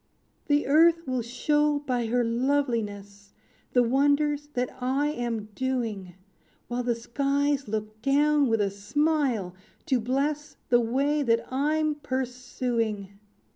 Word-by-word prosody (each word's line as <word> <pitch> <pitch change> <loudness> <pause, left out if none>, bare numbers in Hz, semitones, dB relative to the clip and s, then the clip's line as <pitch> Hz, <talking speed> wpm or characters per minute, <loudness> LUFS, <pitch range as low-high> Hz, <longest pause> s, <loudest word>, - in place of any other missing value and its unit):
"The 290 0 +2
earth 330 +4 +4
will 255 -2 -1
show 295 +5 +1
by 250 -5 -2
her 245 +2 +1
loveliness, 230 -6 -2 0.4
The 245 - +5
wonders 290 +3 +2
that 250 0 -2
I 270 +4 +1
am 235 -6 -3
doing; 225 -8 -3 0.5
While 245 +1 -2
the 240 -1 0
skies 280 +3 0
look 215 0 -4
down 290 +2 +3
with 225 -2 +1
a 200 -1 0
smile, 250 - 0 0.3
to 260 - +2
bless 280 +5 -2
The 240 -1 +5
way 275 +6 +1
that 230 -4 +1
I'm 305 +3 +1
pursuing!" 245 -7 -3
255 Hz, 125 wpm, -27 LUFS, 230-290 Hz, 0.5 s, The